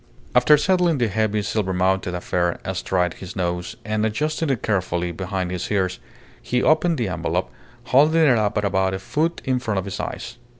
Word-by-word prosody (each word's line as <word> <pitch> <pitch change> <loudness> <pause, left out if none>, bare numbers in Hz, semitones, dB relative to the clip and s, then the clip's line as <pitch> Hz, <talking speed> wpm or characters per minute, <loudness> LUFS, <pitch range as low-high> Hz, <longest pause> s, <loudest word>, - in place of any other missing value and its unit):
After 125 +5 +6
settling 175 0 +2
the 120 -3 +1
heavy 105 0 0
silvermounted 95 -3 0
affair 85 0 -1
astride 95 -1 0
his 95 - -9
nose, 90 -1 -2
and 110 0 -1
adjusting 150 +8 -1
it 135 -4 -1
carefully 90 -4 0
behind 95 +1 -3
his 90 -1 -4
ears, 95 -9 0 0.4
he 125 0 0
opened 160 +1 +3
the 120 -4 -1
envelope, 85 0 -2 0.3
holding 150 +6 +4
it 130 -5 +5
up 105 0 0
at 105 - +1
about 95 -1 +1
a - - -4
foot 160 - -1
in 130 -2 +1
front 110 -5 -2
of 95 - -1
his 100 0 -5
eyes. 120 +1 -5
105 Hz, 180 wpm, -22 LUFS, 90-125 Hz, 0.4 s, After